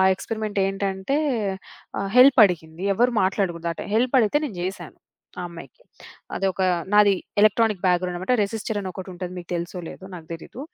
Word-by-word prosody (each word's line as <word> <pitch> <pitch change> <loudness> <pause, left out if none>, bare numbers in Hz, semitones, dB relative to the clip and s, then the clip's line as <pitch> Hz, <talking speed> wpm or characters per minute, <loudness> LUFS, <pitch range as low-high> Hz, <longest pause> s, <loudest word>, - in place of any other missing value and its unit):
Experiment 215 0 -4
ఏంటంటే, 195 +6 -2 0.8
ఆహ్, 195 0 -2
help 260 +1 +7
అడిగింది 165 0 -5
ఎవరు 245 +4 +2
మాట్లాడగూడదు 175 -4 -1
ఆ - - -11
టైంలో. 205 - -6
హెల్ప్ 250 +2 0
అడిగితే 230 +5 +3
నేను 215 -11 -5
జేసాను 180 -3 -6 0.4
ఆ - - -3
అమ్మాయికి. 170 - -12 0.5
అదొక 190 -1 -1 0.3
నాది 210 -1 +6 0.3
ఎలక్ట్రానిక్ 215 -2 +3
బ్యాక్‌గ్రౌండన్నమాట 180 +5 +1
రిజిస్టర్ 215 +1 -3
అని 190 - -5
ఒకటుంటది 180 -1 -7
మీకు 175 - -10
తెలుసో 175 +1 -5
లేదో 190 - -10
నాకు 165 -2 -10
దెలీదు. 165 +9 -9
195 Hz, 150 wpm, -23 LUFS, 180-215 Hz, 0.8 s, హెల్ప్